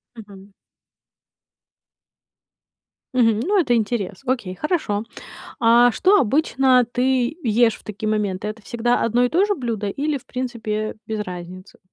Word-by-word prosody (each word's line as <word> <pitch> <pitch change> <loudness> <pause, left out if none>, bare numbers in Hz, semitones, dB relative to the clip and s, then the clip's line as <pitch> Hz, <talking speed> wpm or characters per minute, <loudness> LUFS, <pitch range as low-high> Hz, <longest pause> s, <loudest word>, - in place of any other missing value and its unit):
Мгм. 200 -2 -13 2.6
Мгм, 225 -3 +3
ну, 390 - +2
это 245 -6 +1
интерес. 210 -4 -2
Окей, 240 -8 -2
хорошо. 225 - -1 0.6
А 240 +1 +5
что 385 - +3
обычно 260 -1 +3
ты 255 +3 +1
ешь 230 -1 +3
в - - -14
такие 215 +1 -5
моменты? 210 -2 -1
Это 215 0 -6
всегда 240 +2 0
одно 240 +2 +2
и - - +2
то 350 +8 +2
же 410 -2 0
блюдо 225 -6 -3
или, 290 +7 -2
в 265 - -10
принципе, 225 -4 -4
без 220 -1 -3
разницы? 185 0 -8
230 Hz, 135 wpm, -21 LUFS, 210-255 Hz, 2.6 s, А